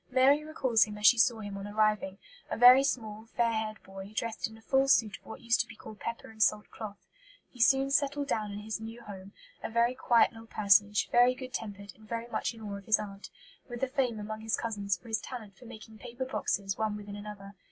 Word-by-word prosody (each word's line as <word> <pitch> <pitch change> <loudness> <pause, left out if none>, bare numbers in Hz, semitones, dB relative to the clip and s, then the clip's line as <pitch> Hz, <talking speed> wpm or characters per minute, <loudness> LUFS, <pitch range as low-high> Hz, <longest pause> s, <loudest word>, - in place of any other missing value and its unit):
Mary 270 +4 +4
recalls 260 -7 +2
him 210 -1 -8
as 210 - -3
she 240 +1 +7
saw 230 -2 +3
him 205 -1 -6
on 200 - -6
arriving 210 -2 0 0.3
a - - -3
very 250 +3 +8
small, 220 -5 -3
fair 235 -1 +3
haired 220 -1 -3
boy, 195 +1 -10
dressed 225 -1 -2
in 220 - -13
"a - - -17
full 270 +2 +2
suit 220 -6 +3
of - - -34
what 220 - -9
used 235 0 +2
to 230 - -6
be 230 - -12
called 215 0 -12
pepper 230 -1 -6
and 220 0 -10
salt 210 0 +3
cloth." 210 -2 -9 0.5
He 245 - -8
soon 270 +3 +4
settled 285 0 +1
down 215 -6 -1
in 200 - -6
his 220 +1 -4
new 225 +2 -8
home, 195 -2 -10 0.3
"a - - -4
very 235 +2 +2
quiet 240 -2 +3
little 225 -1 -13
personage, 205 -1 +3
very 245 +1 +5
good 255 -1 -9
tempered, 200 -4 -6
and 215 -1 -19
very 230 0 -3
much 240 - -2
in 225 - -13
awe 205 -2 -5
of 200 - -17
his 220 - +4
aunt," 200 -1 -8 0.4
with 240 +1 -6
a - - +3
fame 255 -4 -1
among 215 +1 -6
his 220 0 -1
cousins 200 -4 -2
for 175 - -18
his 225 -1 -1
talent 220 -6 -8
for 245 - -16
making 220 -1 -12
paper 245 +2 -6
boxes 200 -5 -2
one 215 -1 -1
within 205 -1 -8
another. 205 -1 -9
220 Hz, 235 wpm, -30 LUFS, 210-240 Hz, 0.5 s, very